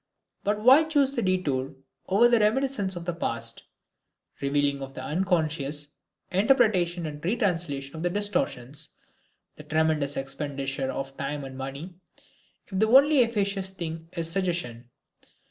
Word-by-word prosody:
But 210 +1 0
why 265 +7 +7
choose 290 -4 +2
the 245 - -2
detour 145 - 0 0.3
over 205 +6 +5
reminiscences 215 -3 +1
of 170 -1 -6
the 175 - -1
past, 115 -8 -2 0.8
revealing 140 0 +1
of 135 0 -7
the - - -6
unconscious, 150 -4 -1 0.4
interpretation 190 -5 +3
and 150 -1 -7
retranslation 165 - -1
of 175 - +1
distortions, 150 -8 -2 0.6
the - - -10
tremendous 155 -2 0
expenditure 135 -1 -3
of 135 0 -5
time 140 +1 -3
and 135 -1 -8
money, 135 +7 -6 0.7
if 190 -3 -4
the 220 - +4
only 280 +5 +6
efficacious 200 -4 0
thing 165 -3 -6
is 165 -2 -2
suggestion? 165 -10 -2
165 Hz, 130 wpm, -27 LUFS, 140-200 Hz, 0.8 s, why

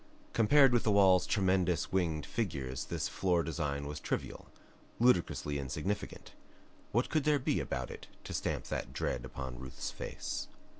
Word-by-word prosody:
Compared 135 +3 +6
with 120 - +4
the 110 - +1
wall's 95 -3 +5
tremendous 95 -3 +2
winged 85 -6 0
figures 70 - -3
this - - -2
floor 90 -3 +1
design 70 -3 -2
was 75 0 -5
trivial, - - -4 0.5
ludicrously 85 - +2
insignificant. 75 +9 -4 0.6
What 120 +4 +2
could 155 -3 +1
there 150 0 +4
be 130 - 0
about 65 -1 -3
it - - -9 0.2
to - - -6
stamp - - -1
that 65 - -3
dread 60 -2 -2
upon 65 -2 -6
Ruth's 65 0 -5
face? - - -5
90 Hz, 150 wpm, -33 LUFS, 70-105 Hz, 0.6 s, Compared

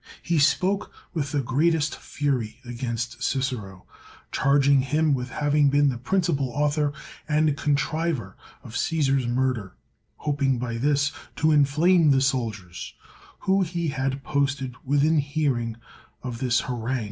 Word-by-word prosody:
He 170 -2 +1
spoke 190 +7 +2 0.2
with 145 -5 -2
the 145 -3 0
greatest 150 +4 +1
fury 125 -6 -2
against 120 0 -4
CHcero, 125 -9 -2 0.5
charging 140 0 +4
him 150 +3 +1
with 125 -2 -2
having 145 +1 +2
been 145 0 +4
the 125 -3 -3
principal 140 -2 0
author 145 +3 +1 0.4
and 150 -1 +2
contriver 145 - -1 0.3
of - - -11
C8Bsar*s 135 -3 +1
murder, 120 -5 -1 0.4
hoping 140 -3 0
by 115 -1 -3
this 145 +2 +2 0.2
to 155 +1 +2
inflame 155 +3 +4
the 135 -1 +5
soldiers, 115 -9 -2 0.5
whom 190 0 +2
he 170 -2 -2
had 135 -1 -2
posted 140 -2 -1
within 145 +3 +3
hearing 140 -6 -1 0.5
of 125 -3 -5
his 125 0 +2
harang. 125 +1 -2
140 Hz, 130 wpm, -25 LUFS, 125-150 Hz, 0.5 s, the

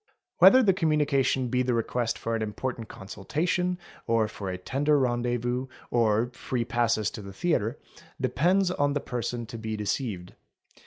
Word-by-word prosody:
Whether 260 0 +8
the 195 -4 +5
communication 150 -6 +2
L 125 - -2
be 125 +1 +1
the 125 -1 +1
request 115 0 -1
for 115 0 -2
an 115 - -2
important 115 +2 -4
consultation, 170 - -2 0.3
or 115 -2 +2
for 100 -2 -6
a 90 - -3
tender 140 +10 +1
rendezvous, 120 0 0 0.2
or 115 0 +2
free 125 -2 -2
passes 115 -3 +1
for - - -7
the 100 -1 -9
theatre, 115 - 0 0.4
depends 180 +4 +2
on 145 -4 +1
the 145 - 0
person 120 -2 -3
to 115 +1 -8
be 110 -1 -4
deceived. 105 -4 -3
120 Hz, 160 wpm, -27 LUFS, 110-145 Hz, 0.4 s, Whether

